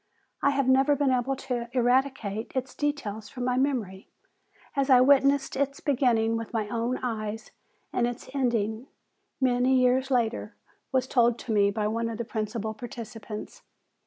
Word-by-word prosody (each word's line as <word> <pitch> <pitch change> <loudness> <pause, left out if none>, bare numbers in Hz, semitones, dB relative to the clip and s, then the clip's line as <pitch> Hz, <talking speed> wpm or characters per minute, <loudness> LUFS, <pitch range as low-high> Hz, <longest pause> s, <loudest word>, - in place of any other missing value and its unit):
I - - +4
have 275 -2 +1
never 270 +2 +4
been 280 -1 +2
able 255 +2 +1
to 245 -3 -4
eradicate 245 -4 0
its 260 0 -2
details 220 -8 -3
from 250 -2 -5
my 250 0 +1
memory, 245 -8 -1 0.7
as 275 0 +1
I 255 -2 +8
witnessed 275 +1 +4
its 275 +1 -1
beginning 235 -5 +2
with 230 +1 -6
my 220 -2 -1
own 235 +2 -1
eyes, 220 -2 -4 0.4
and 240 - +2
its 240 -1 -6
ending, 235 -3 -1 0.5
many 255 0 +3
years 255 +1 +2
later, 240 -3 0 0.4
was 260 -1 +2
told 240 -2 +3
to 235 - -6
me 200 -1 +4
by 210 +1 -1
one 230 +2 -1
of 225 - -5
the 235 - -3
principal 220 0 -3
participants." 220 -2 -8
245 Hz, 160 wpm, -27 LUFS, 225-265 Hz, 0.7 s, I